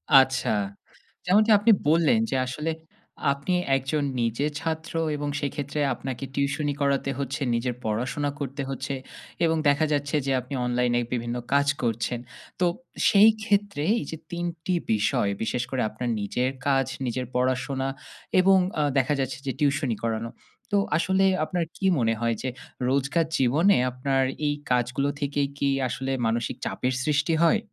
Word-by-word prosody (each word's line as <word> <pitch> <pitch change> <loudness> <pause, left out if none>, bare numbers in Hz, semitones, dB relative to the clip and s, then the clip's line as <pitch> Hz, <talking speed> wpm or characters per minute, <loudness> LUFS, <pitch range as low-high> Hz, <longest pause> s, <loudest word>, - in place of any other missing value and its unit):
আচ্ছা। 130 -1 +5 0.8
যেমনটি 210 +5 +4
আপনি 215 +3 +4 0.2
বললেন 165 +8 +4
যে - - -1
আসলে 150 +6 -3 0.6
আপনি 140 +6 -2 0.2
একজন 135 +3 -1 0.2
নিজে 115 +5 0
ছাত্র 160 0 -4 0.2
এবং 145 0 -3
সেইক্ষেত্রে 145 +1 -3
আপনাকে 130 +1 -6
টিউশনি 145 +1 0
করাতে 140 -1 +1
হচ্ছে, 140 +1 -3
নিজের 120 +1 -1
পড়াশোনা 125 +7 -1
করতে 140 0 -4
হচ্ছে। 135 +1 -3 0.5
এবং 160 0 +2
দেখা 145 +2 +4
যাচ্ছে 145 0 -1
যে 135 - 0
আপনি 125 +3 -8
অনলাইনে 125 0 +1
বিভিন্ন 120 0 -2 0.2
কাজ 140 0 +4 0.2
করছেন। 115 +1 -1 0.4
তো 180 - +3 0.4
সেই 205 +2 +7
ক্ষেত্রে 205 -7 +1 0.2
এইযে 160 - -6
৩ 175 0 -2 0.2
টি 185 - +1 0.2
বিষয় 105 -1 +1
বিশেষ 125 +2 -1
করে 130 -2 0
আপনার 120 +3 -4
নিজের 125 +5 0 0.2
কাজ, 135 -1 +3 0.2
নিজের 125 +1 -2
পড়াশোনা 130 +1 0 0.5
এবং 190 +1 +6 0.2
আ - - +3
দেখা 135 +2 +3
যাচ্ছে 130 -1 -2
যে - - +1
টিউশনি 145 -5 +1
করানো। 115 0 -1 0.4
তো - - +2 0.2
আসলে 190 +3 +2 0.2
আপনার 175 -1 -1
কি 195 - -3
মনে 115 -1 +2
হয় 115 -1 +1
যে 130 - -2 0.4
রোজকার 140 +5 +1
জীবনে 150 +10 +4 0.2
আপনার 135 +1 0 0.2
এই 145 - +2 0.2
কাজগুলো 125 +3 +1
থেকে 145 0 -1 0.2
কি 140 -1 +1 0.2
আসলে 135 +2 -3
মানসিক 115 +1 -1
চাপের 130 +1 -1
সৃষ্টি 150 +2 +2
হয়? 165 - +4
140 Hz, 150 wpm, -26 LUFS, 125-150 Hz, 0.8 s, সেই